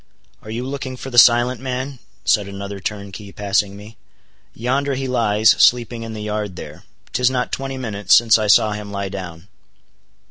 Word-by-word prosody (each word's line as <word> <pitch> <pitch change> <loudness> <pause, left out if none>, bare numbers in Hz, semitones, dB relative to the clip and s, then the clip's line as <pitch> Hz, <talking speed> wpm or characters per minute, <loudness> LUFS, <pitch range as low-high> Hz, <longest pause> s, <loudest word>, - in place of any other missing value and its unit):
"Are 110 - -12
you 120 +3 -4
looking 130 -1 -5
for 135 - -8
the 120 - +6
silent 120 +1 +5
man?" 130 +1 -4 0.3
said 105 -2 +2
another 100 0 -7
turnkey 100 +1 -6
passing 100 0 -1
me. 105 +2 -13 0.6
"Yonder 135 +4 -1
he 135 0 -3
lies—sleeping 115 0 +3
in 115 -1 -6
the 105 - -6
yard 105 -3 -3
there. - - -10 0.3
'Tis 125 +2 +3
not 125 -1 -2
twenty 135 0 -4
minutes 105 -5 +2
since 115 -1 +5
I 105 - -1
saw 105 +1 +5
him 105 -1 -6
lie 100 -1 -3
down." 90 -2 -8
110 Hz, 170 wpm, -20 LUFS, 100-125 Hz, 0.6 s, the